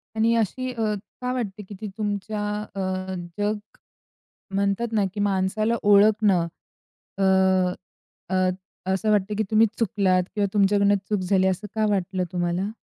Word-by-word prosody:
आणि 225 +1 +3
अशी 255 +4 -2
अ, 230 - -4 0.4
का 250 - -1
वाटते 210 -5 -4
की 200 +1 -10
ती 215 - -4
तुमच्या 210 0 -2 0.3
अ, - - -4 0.6
जग 210 +1 +1 1.0
म्हणतात 200 +4 +1
ना, 210 -3 +2
की 210 - -5
माणसाला 205 +3 +1
ओळखणं, 205 -3 +4 0.7
अ, 195 - 0 1.1
अ, 185 0 +3 0.4
असं 215 +3 +1
वाटतं, 210 0 +1
की 220 - +2
तुम्ही 220 +1 +5
चुकलात 195 -5 +2
किंवा 205 -1 +1
तुमच्याकडून 200 0 +4
चूक 210 - +1
झाली, 185 +1 +2
असं 190 +3 -1
का 220 0 +2
वाटलं 190 -1 -1
तुम्हाला? 175 +2 -1
205 Hz, 140 wpm, -24 LUFS, 190-215 Hz, 1.1 s, तुम्ही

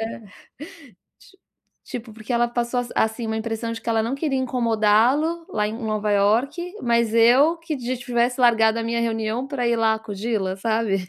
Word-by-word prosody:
é, 225 +1 -5 1.0
ti 385 - -21 0.5
tipo, 240 -3 -7
porque 220 +3 -7
ela 240 0 +2
passou 240 +1 -1
as 245 - -7
assim, 220 +1 0
uma 220 - -2
impressão 225 +1 -3
de 225 - -6
que - - -8
ela 225 -1 +2
não 230 +4 -2
queria 275 -2 -1
incomodá-lo 250 +6 +1
lá 210 -1 0
em - - -5
Nova 215 -2 -2
York, 225 - +2 0.2
mas 235 -2 +1
eu 255 +8 +5
que 330 -2 -4 0.2
tivesse 245 +1 -1
largado 225 -2 +4
a - - -3
minha 235 0 -1
reunião 225 +2 -2
pra 250 -4 -1
ir 235 - +2
lá 225 -1 +2
acudi-la, 210 -2 -3
sabe. 205 -3 -1
230 Hz, 180 wpm, -23 LUFS, 220-245 Hz, 1.0 s, eu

